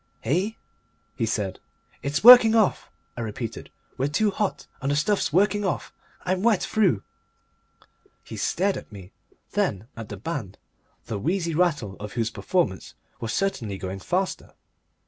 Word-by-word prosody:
"Eh?" 185 +9 0 0.6
he 115 - -1
said. 105 -4 -2 0.4
"It's 145 +5 -2
working 235 -2 +10
off," 220 -4 +2 0.3
I 120 - -5
repeated. 115 +1 -5 0.3
"We're 135 - +2
too 205 +9 +1
hot 200 0 -2 0.2
and 135 - -1
the 145 - +2
stuff's 190 +6 +1
working 205 +5 +3
off! 190 - -2 0.3
I'm 185 +1 0
wet 220 -3 +3
through." 185 - +2 1.2
He - - -9
stared 195 +3 0
at - - -10
me. 95 -3 -11 0.4
Then 100 +3 -1
at 115 -2 -8
the - - -6
band, - - -5 0.5
the 105 - -4
wheezy 170 - -1
rattle 150 - 0
of 105 0 -7
whose 115 -2 -1
performance 140 - -1 0.2
was 115 - -3
certainly 120 - -1
going 95 0 -5
faster. 185 - -2
150 Hz, 145 wpm, -25 LUFS, -, 1.2 s, working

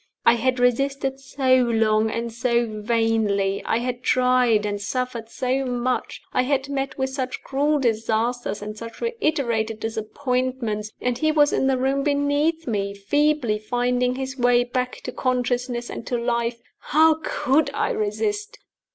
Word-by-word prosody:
I 230 - +7
had 250 +2 +1
resisted 270 +2 +1
so 265 -1 +2
long 220 -3 +2
and 230 +1 -3
so 235 0 +1
vainly; 215 -3 0
I - - +1
had 245 +1 -3
tried 250 -4 +3
and 205 -1 -2
suffered 245 0 -3
so 260 +3 -1
much; 250 0 -2
I - - +3
had 270 +1 0
met 275 -1 -3
with 265 -1 -1
such 260 -1 -4
cruel 290 +3 +1
disasters 230 -2 -1
and 210 0 -6
such 230 +1 -9
reiterated 260 - -1
disappointments 225 0 -2
and 245 0 -1
he 310 0 +2
was 295 -1 +4
in 265 - +2
the 265 -1 +2
room 270 +2 +1
beneath 290 +3 +1
me, 200 -4 -2
feebly 270 +1 +1
finding 245 +3 0
his 265 0 -5
way 245 0 +4
back 250 +1 -3
to - - -4
consciousness 245 -1 -1
and - - -6
to 245 - 0
life 235 0 -1 0.2
how 315 +1 +4
could 280 +4 +1
I - - 0
resist? 425 +1 -2
250 Hz, 150 wpm, -23 LUFS, 230-270 Hz, 0.2 s, I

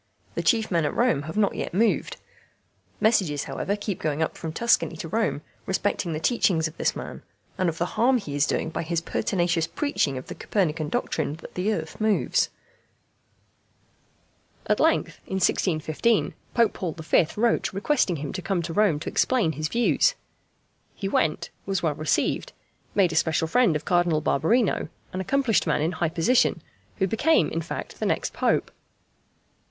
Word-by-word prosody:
The - - -2
chief 225 -4 +2
men 170 -3 +2
at 150 - -1
Rome 235 - +2
have 160 - -5
not 205 -2 +3
yet - - -4
moved. 225 +3 +1 0.8
Messages, 190 -10 +2
however, 140 +9 -2
keep 205 -2 -4
going 155 0 0
up - - -3
from 160 - -5
Tuscany 230 -3 +1
to 165 - -5
Rome 215 -5 -1 0.2
respecting 190 -2 -1
the 155 - -2
teachings 165 -4 +2
of 160 - -11
this - - 0
man, - - -7 0.3
and 185 -2 +1
of 165 - -5
the 175 - 0
harm 250 +8 +2
he 175 -11 -6
is 145 +1 +2
doing 160 - -1
by - - -3
his 165 0 -1
pertinacious 170 -1 0
preaching 215 - -1
of 130 - -7
the - - -7
Copernican 160 -6 -1
doctrine 155 - -1
that 165 - -12
the 185 +4 0
earth 160 -1 -4
moves. 215 -2 +2 2.2
At - - +1
length, - - +1
in 190 - -3
1615, 185 +3 +1 0.2
Pope 230 -3 +4
Paul 175 -4 -3
V. 160 +1 +2
wrote 235 +2 +1
requesting 200 - +1
him 145 -2 -5
to 185 - -4
come 185 -2 -1
to 165 0 -4
Rome 200 -7 +3
to - - -7
explain 235 -11 +2
his 155 0 -3
views. 240 - +2 0.8
He 195 - -3
went, 160 -5 0 0.2
was 195 -2 -1
well 155 -3 +2
received, 155 +1 -1 0.4
made 190 -4 +4
a - - -4
special 160 0 +2
friend 225 -2 +3
of 150 - -3
Cardinal 175 -3 +2
Barberino 180 - +1 0.2
an 185 - -2
accomplished 255 -1 +1
man 150 -1 +1
in 165 - +1
high 170 -2 -1
position, 170 +10 +2 0.3
who 190 - +2
became 225 - +2
in 165 - -1
fact 165 - -6
the - - 0
next - - -1
Pope. - - +1
175 Hz, 175 wpm, -25 LUFS, 160-215 Hz, 2.2 s, Pope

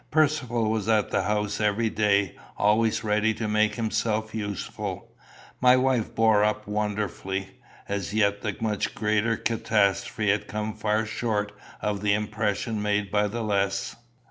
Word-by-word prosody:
Percivale 145 -7 +1
was 110 0 -1
at 110 -2 +2
the - - +2
house 105 0 -1
every 105 +2 +1
day, 100 -2 +2 0.2
always 110 +2 +2
ready 105 +1 +1
to 110 - -3
make 105 0 +2
himself 110 -1 -1
useful. 105 -3 -5 0.5
My 125 0 +6
wife 130 -3 +1
bore 110 -2 +4
up 105 0 0
wonderfully. 100 -2 -3 0.3
As 100 -3 -3
yet 100 -1 +1
the 105 - -3
much 105 -3 -1
greater 110 +1 +1
catastrophe 105 -2 +1
had 105 - -1
come 105 +1 -3
far 110 +1 0
short 105 -2 -2 0.3
of 105 -1 -1
the 105 -1 +3
impression 105 +1 -2
made 105 -1 0
by 105 0 +2
the 115 +3 -4
less. 100 -2 0
105 Hz, 145 wpm, -26 LUFS, 105-110 Hz, 0.5 s, My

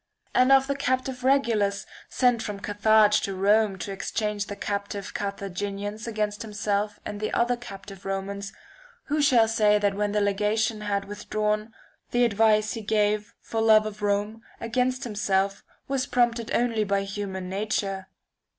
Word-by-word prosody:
And 255 +1 +4
of 270 0 +6
the 280 - -1
captive 260 -1 -1
Regulus, 230 -7 +2 0.2
sent 245 -3 +2
from 210 -3 -5
Carthage 210 +1 +4
to 195 - -3
Rome 205 +1 +3
to 195 - -5
exchange 205 +1 -2
the 205 - -5
captive 200 -1 -4
Carthaginians 200 +2 -4
against 210 -2 -2
himself 210 -1 -2
and 205 -1 -5
the 215 - -2
other 240 +1 +2
captive 195 -5 -10
Romans, 195 +1 -4 0.6
who 300 +1 +1
shall 245 -6 +5
say 210 -2 +3
that 205 -1 +1
when 205 +1 -1
the 210 - +1
legation 210 +2 0
had 200 -1 -1
with 205 +1 -9
drawn, 215 +1 0 0.4
the 245 0 +3
advice 215 -1 +3
he 225 - -5
gave, 210 0 0
for 225 - -3
love 215 -1 +6
of 215 0 -6
Rome, 205 +2 -1 0.2
against 255 +2 0
himself, 200 -3 0 0.2
was 275 0 -1
prompted 240 -2 +1
only 230 -3 +1
by 200 -1 0
human 195 -2 -5
nature? 195 -1 -2
210 Hz, 155 wpm, -26 LUFS, 200-225 Hz, 0.6 s, of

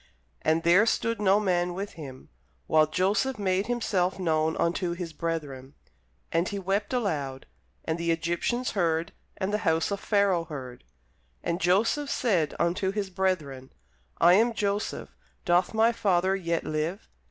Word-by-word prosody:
And 160 +1 +1
there 185 +6 +5
stood 230 -1 0
no 200 0 +4
man 180 -3 0
with 200 +2 -4
him, 135 -5 -10 0.4
while 155 -1 +4
Joseph 200 - 0
made 195 0 0
himself 200 -7 0
known 160 -3 0
unto 170 +1 0
his 170 -2 -6
brethren. 145 -6 -4 0.6
And 165 +2 +1
he 205 - -4
wept 195 +2 -1
aloud: 150 - -2 0.4
and 160 +1 -2
the 170 0 -1
Egyptians 170 +10 -1
heard, 165 -3 0 0.3
and 195 +1 -2
the 210 - +1
house 165 -3 +1
of 200 - -2
Pharaoh 200 -6 +2
heard. 130 -6 -8 0.6
And 170 +1 -2
Joseph 220 - +2
said 180 - +1
unto 175 +3 0
his 200 -2 -3
brethren, 150 -9 -2 0.5
I 175 +1 +6
am 230 +5 +4
Joseph; 205 0 -2 0.3
doth 175 -1 +3
my 225 +1 +3
father 195 -5 +1
yet 170 -3 -1
live? 155 +6 -3
180 Hz, 150 wpm, -27 LUFS, 165-200 Hz, 0.6 s, I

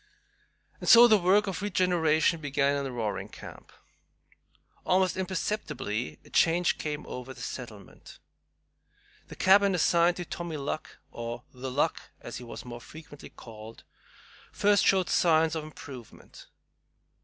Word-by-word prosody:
And - - -3
so 235 +1 +10
the 215 -3 +5
work 195 +4 +3
of 195 -2 -4
regeneration 170 -5 +1
began 140 -1 +1
in - - -6
Roaring 110 -4 -4
Camp. - - -12 1.1
Almost 185 0 +2
imperceptibly 175 - -3
a - - -18
change 170 +1 +2
came 150 -1 -4
over 125 +1 -8
the - - -12
settlement. 110 -6 -9 1.1
The - - -10
cabin 195 0 +4
assigned 170 0 +3
to 175 - -5
"Tommy 170 -3 -5
Luck" 145 +2 -5
or 120 +1 -6
"The 130 +1 -6
Luck," 135 +3 0 0.2
as - - -8
he 125 - -9
was 120 - -9
more 120 -1 -8
frequently 155 0 -12
called 110 -1 -12 0.7
first 205 -1 +3
showed 190 -2 +3
signs 160 -1 +3
of 160 - -3
improvement. 135 -6 -12
155 Hz, 130 wpm, -28 LUFS, 125-185 Hz, 1.1 s, so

